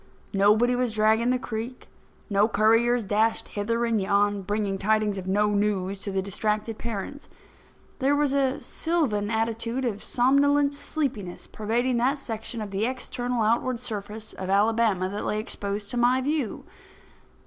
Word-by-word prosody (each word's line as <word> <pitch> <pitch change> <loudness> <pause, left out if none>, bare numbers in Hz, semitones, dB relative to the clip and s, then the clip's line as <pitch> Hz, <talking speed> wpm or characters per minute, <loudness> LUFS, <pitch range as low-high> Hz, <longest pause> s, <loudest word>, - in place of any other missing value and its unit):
Nobody 210 +5 +4
was 245 -2 0
dragging 220 +2 +3
the 255 - +3
creek; 240 +1 -6 0.4
no 205 +1 +3
couriers 225 +3 +3
dashed 215 +3 +1
hither 230 +3 -1
and 225 -3 +1
yon, 200 +1 +2
bringing 200 0 -2
tidings 210 -1 +1
of 185 - -8
no 210 +2 +2
news 200 -2 0
to 200 0 -5
the 190 0 -1
distracted 210 +3 -2
parents. 235 +5 -5 0.7
There 275 +2 +3
was 290 -1 +1
a 275 -1 +1
sylvan 275 -12 -1
attitude 230 +3 -1
of 210 -4 -2
somnolent 280 +3 +3
sleepiness 275 - -3
pervading 235 +4 -1
that 260 +5 +2
section 225 -3 -5
of 205 - -7
the 195 +2 -1
external 245 -2 -2
outward 235 +2 +1
surface 215 -2 -6
of 190 0 -6
Alabama 205 -1 +2
that 205 +2 -4
lay 210 - -1
exposed 205 -1 -4
to 245 - -3
my 245 +2 +4
view. 280 -3 -2
220 Hz, 150 wpm, -26 LUFS, 205-245 Hz, 0.7 s, Nobody